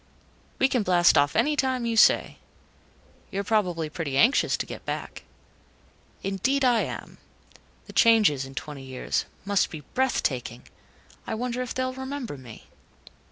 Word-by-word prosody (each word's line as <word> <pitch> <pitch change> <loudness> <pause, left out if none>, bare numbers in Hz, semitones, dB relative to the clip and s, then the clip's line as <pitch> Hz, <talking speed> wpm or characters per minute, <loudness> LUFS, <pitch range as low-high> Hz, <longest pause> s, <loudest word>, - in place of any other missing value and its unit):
"We 265 - +4
can 255 -3 0
blast 180 -3 +4
off 145 0 +3
anytime 265 -4 +1
you 230 -1 -1
say. 220 - +4 0.9
You're 200 +1 -3
probably 180 -7 0
pretty 150 -3 -4
anxious 245 - +4
to - - -3
get - - -9
back." - - -6 1.0
"Indeed, 245 +9 0
I 240 -3 +4
am. - - -6 0.7
The - - -12
changes, 215 - +4
in 135 0 -10
twenty 150 -1 -6
years 130 -1 -2 0.2
must 200 -2 +1
be 155 - -8
breathtaking. 130 - -1 0.6
I - - -2
wonder 245 +2 -3
if 250 - -5
they'll 255 0 -1
remember 265 - -5
me?" 125 -5 -12
210 Hz, 140 wpm, -26 LUFS, -, 1.0 s, We